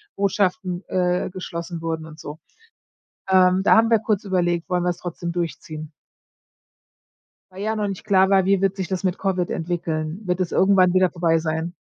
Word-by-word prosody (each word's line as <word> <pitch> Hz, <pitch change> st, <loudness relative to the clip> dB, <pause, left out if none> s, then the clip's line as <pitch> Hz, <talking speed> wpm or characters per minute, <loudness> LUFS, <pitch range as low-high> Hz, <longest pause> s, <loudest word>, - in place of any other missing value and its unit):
Botschaften, 195 Hz, -2 st, 0 dB
äh, 180 Hz, -1 st, 0 dB
geschlossen 170 Hz, -2 st, -6 dB
wurden 160 Hz, -1 st, -3 dB
und 155 Hz, 0 st, -13 dB
so. 150 Hz, +2 st, -8 dB, 0.9 s
Ähm, 185 Hz, 0 st, +4 dB
da -, -, +6 dB
haben 225 Hz, +1 st, +4 dB
wir 225 Hz, -2 st, +4 dB
kurz 215 Hz, -2 st, -1 dB
überlegt: 175 Hz, -3 st, 0 dB
„Wollen 180 Hz, -1 st, 0 dB
wir's 175 Hz, -1 st, -1 dB
trotzdem 175 Hz, -1 st, -5 dB
durchziehen?” 155 Hz, -2 st, -5 dB, 1.6 s
Weil 190 Hz, +2 st, -8 dB
ja 220 Hz, +1 st, -1 dB
noch 210 Hz, -1 st, -1 dB
nicht 195 Hz, +1 st, -6 dB
klar 190 Hz, -2 st, +4 dB
war, 195 Hz, -1 st, +4 dB
wie 195 Hz, 0 st, +2 dB
wird 195 Hz, 0 st, +1 dB
sich 190 Hz, -2 st, -3 dB
das 190 Hz, 0 st, -3 dB
mit 185 Hz, -1 st, 0 dB
Covid 185 Hz, -3 st, -1 dB
entwickeln? 165 Hz, 0 st, -3 dB
Wird 180 Hz, 0 st, -1 dB
es 180 Hz, -, -1 dB
irgendwann 190 Hz, -2 st, +4 dB
wieder 185 Hz, -1 st, +3 dB
vorbei 165 Hz, -2 st, +1 dB
sein? 160 Hz, +1 st, -3 dB
180 Hz, 175 wpm, -22 LUFS, 170-195 Hz, 1.6 s, da